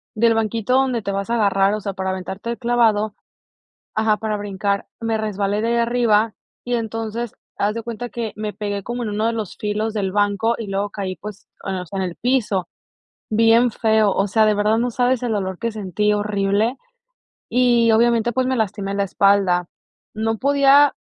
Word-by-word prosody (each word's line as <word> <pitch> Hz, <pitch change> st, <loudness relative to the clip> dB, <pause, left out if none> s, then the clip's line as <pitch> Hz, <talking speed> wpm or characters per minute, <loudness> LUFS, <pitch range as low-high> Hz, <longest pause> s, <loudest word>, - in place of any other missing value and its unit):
del 230 Hz, +1 st, +3 dB
banquito 225 Hz, +2 st, 0 dB
donde 260 Hz, -3 st, +2 dB
te 200 Hz, -, -3 dB
vas 200 Hz, +2 st, -3 dB
a 235 Hz, -, +1 dB
agarrar, 200 Hz, -2 st, +3 dB
o 215 Hz, -, -2 dB
sea, 200 Hz, -1 st, -4 dB
para 190 Hz, 0 st, -2 dB
aventarte 190 Hz, +4 st, -5 dB
el 235 Hz, -, -4 dB
clavado, 225 Hz, -3 st, +2 dB, 0.8 s
ajá, 220 Hz, -1 st, +2 dB
para 215 Hz, -1 st, -2 dB
brincar, 200 Hz, -1 st, -2 dB
me 225 Hz, -1 st, -1 dB
resbalé 205 Hz, -1 st, -1 dB
de 230 Hz, -, 0 dB
allá 235 Hz, 0 st, +2 dB
arriba 230 Hz, -2 st, +2 dB, 0.3 s
y 245 Hz, 0 st, -2 dB
entonces 225 Hz, 0 st, -3 dB, 0.2 s
haz 210 Hz, +2 st, +1 dB
de 230 Hz, -, -4 dB
cuenta 235 Hz, +1 st, -5 dB
que 230 Hz, -3 st, -4 dB
me 210 Hz, -1 st, -4 dB
pegué 205 Hz, -2 st, -3 dB
como 240 Hz, +2 st, -4 dB
en 215 Hz, -, -3 dB
uno 215 Hz, +2 st, 0 dB
de 230 Hz, -, +1 dB
los 215 Hz, -4 st, -5 dB
filos 215 Hz, +1 st, -2 dB
del 195 Hz, -3 st, -1 dB
banco 205 Hz, +2 st, +1 dB
y 225 Hz, -, -5 dB
luego 200 Hz, +1 st, -2 dB
caí, 190 Hz, -3 st, -4 dB
pues, 210 Hz, -1 st, -10 dB, 0.2 s
en, 190 Hz, -, -2 dB
o 180 Hz, -, -5 dB
sea, 195 Hz, +3 st, -6 dB
en -, -, 0 dB
el 175 Hz, -2 st, -5 dB
piso, 225 Hz, -7 st, 0 dB, 0.6 s
bien 230 Hz, +2 st, +4 dB
feo. 220 Hz, -2 st, +2 dB
O 195 Hz, -, +1 dB
sea, 220 Hz, +2 st, +3 dB
de 210 Hz, -, +3 dB
verdad 210 Hz, +2 st, +2 dB
no 245 Hz, +1 st, 0 dB
sabes 250 Hz, +1 st, +1 dB
el 240 Hz, -2 st, -1 dB
dolor 190 Hz, -3 st, -2 dB
que 230 Hz, -1 st, -2 dB
sentí 210 Hz, 0 st, 0 dB
horrible. 205 Hz, +3 st, 0 dB, 0.7 s
Y, 240 Hz, -1 st, +4 dB
obviamente, 235 Hz, +1 st, +3 dB
pues, 255 Hz, +1 st, 0 dB
me 260 Hz, 0 st, 0 dB
lastimé 200 Hz, -2 st, -2 dB
la 200 Hz, 0 st, +1 dB
espalda. 195 Hz, -3 st, +2 dB, 0.5 s
No 220 Hz, 0 st, -1 dB
podía 280 Hz, +1 st, +5 dB
215 Hz, 195 wpm, -21 LUFS, 200-235 Hz, 0.8 s, podía